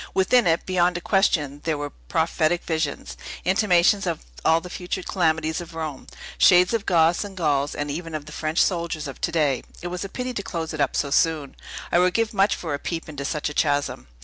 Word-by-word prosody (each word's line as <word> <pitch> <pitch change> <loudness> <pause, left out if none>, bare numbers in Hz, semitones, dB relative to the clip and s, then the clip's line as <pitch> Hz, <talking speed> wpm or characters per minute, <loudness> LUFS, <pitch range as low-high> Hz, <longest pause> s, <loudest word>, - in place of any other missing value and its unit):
Within 205 +4 +4
it, 165 0 +2
beyond 180 -1 +2
a - - -3
question, 155 -7 +1
there 160 -2 0
were 145 0 -4
prophetic 165 +1 0
visions, 155 - -3 0.3
intimations 190 0 +3
of 165 - -3 0.2
all 160 - +4
the 180 - -10
future 180 +1 -4
calamities 160 -2 0
of 170 -1 -10
Rome, 155 -4 -5 0.3
shades 180 +3 +6
of 225 -2 -1
Goths, 170 0 +3
and 200 -2 -9
Gauls, 145 -4 0
and 145 0 -3
even 165 +1 -5
of 150 -1 -5
the 150 - -11
French 155 +1 -2
soldiers 170 -4 -2
of 135 - -9
to 170 - 0
day. 150 -6 +1 0.2
It 175 - -3
was 180 +1 -4
a 195 - -5
pity 250 +4 -4
to 205 - -3
close 165 -4 -4
it 155 - -2
up 140 - +1
so 140 - -1
soon! 155 -3 +1 0.4
I 175 - +4
would 180 +1 +2
give 225 -1 +1
much 200 0 +3
for 160 -4 -4
a 140 - -2
peep 165 +2 -4
into 145 -3 -6
such 150 +1 -2
a 150 - -4
chasm." 145 - 0
165 Hz, 220 wpm, -24 LUFS, 150-180 Hz, 0.4 s, shades